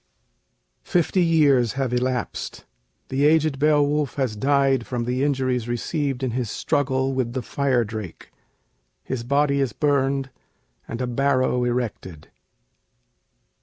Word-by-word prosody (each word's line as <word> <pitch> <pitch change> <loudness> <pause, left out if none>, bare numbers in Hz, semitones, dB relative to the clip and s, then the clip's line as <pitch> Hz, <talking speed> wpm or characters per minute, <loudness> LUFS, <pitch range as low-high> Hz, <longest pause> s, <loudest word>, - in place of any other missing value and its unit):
[Fifty 180 +2 +1
years 145 -8 +3
have 130 -2 -2
elapsed. 125 0 -2 0.4
The 135 +2 0
aged 155 -3 +2
Beowulf 150 -1 +2
has 130 -6 -1
died 135 +1 +2
from 120 -2 -2
the 125 +2 -1
injuries 130 -4 0
received 135 +2 -2
in 130 - 0
his 120 -2 -2
struggle 135 0 0
with 125 -3 -1
the 130 -1 -3
Fire 130 -1 +1
Drake. 110 -5 -8 0.7
His 130 -3 -4
body 140 +2 +2
is 135 -5 0
burned, 135 -1 0 0.6
and 115 +2 -5
a - - 0
barrow 130 0 +1
erected. 115 -10 -4
130 Hz, 125 wpm, -23 LUFS, 125-140 Hz, 0.7 s, years